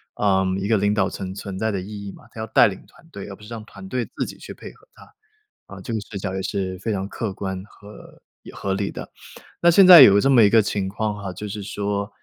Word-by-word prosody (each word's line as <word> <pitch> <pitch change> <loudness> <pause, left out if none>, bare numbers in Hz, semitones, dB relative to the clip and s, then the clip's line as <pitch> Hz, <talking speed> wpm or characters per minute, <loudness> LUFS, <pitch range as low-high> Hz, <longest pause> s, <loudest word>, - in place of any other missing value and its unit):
呃， 95 -2 +1
一 100 - -3
个 110 0 +3
领 100 +1 +1
导 100 -3 +1
层 95 -1 -6
存 100 -1 -7
在 110 - 0
的 100 -2 -3
意 100 +1 -8
义 100 - -6
嘛， - - -16
它 - - -11
要 110 - -4
带 - - +5
领 95 -3 -7
团 165 - -22
队， 100 -11 -9
而 100 - -8
不 105 - -18
是 105 - -12
让 115 -2 -7
团 100 -3 -12
队 125 0 -2
自 - - -1
己 - - -10
去 - - -10
配 - - -11
合 - - -25
它。 - - -18 0.5
啊， - - -11
这 120 - -7
个 110 - -2
视 105 0 -11
角 95 - -4
也 95 - -3
是 95 -1 -3
非 110 +4 -3
常 95 -1 -3
客 105 -1 -4
观 95 -1 -5
和 105 0 -16 0.2
也 - - -13
合 100 - -3
理 100 0 -2
的。 - - -9 0.5
那 170 - +5
现 190 +3 +6
在 180 -3 +11
有 100 -5 +7
这 135 - +2
么 120 -5 +6
一 100 - +6
个 110 0 +5
情 100 -2 -2
况 105 +2 -3
哈， 95 -2 -6
就 105 +4 -7
是 105 +1 -6
说 100 0 -3
100 Hz, 295 characters per minute, -22 LUFS, 95-110 Hz, 0.5 s, 在